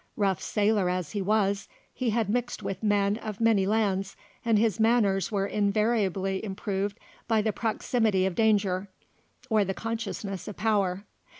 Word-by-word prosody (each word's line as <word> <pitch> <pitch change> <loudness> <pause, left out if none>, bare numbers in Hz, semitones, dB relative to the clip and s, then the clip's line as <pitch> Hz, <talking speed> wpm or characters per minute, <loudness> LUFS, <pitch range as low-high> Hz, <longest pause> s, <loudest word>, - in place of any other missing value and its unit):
Rough 195 -5 +1
sailor 205 -3 +1
as 180 -4 -2
he 205 - -2
was, 200 0 +1 0.3
he 255 -2 -1
had 225 -1 +1
mixed 240 +3 -2
with 190 -1 -4
men 205 -1 +2
of 215 -3 -6
many 220 -4 +3
lands, 200 -3 0 0.3
and 230 -2 +3
his 220 0 +1
manners 220 -3 +2
were 195 -2 0
invariably 200 -2 0
improved 200 0 -3 0.3
by 220 -2 +2
the 215 -1 0
proximity 220 -3 +1
of 190 - 0
danger 200 -2 +2 0.6
or 220 -4 +3
the 195 0 -3
consciousness 220 -4 -4
of 210 - -7
power. 200 -2 0
205 Hz, 155 wpm, -27 LUFS, 195-220 Hz, 0.6 s, many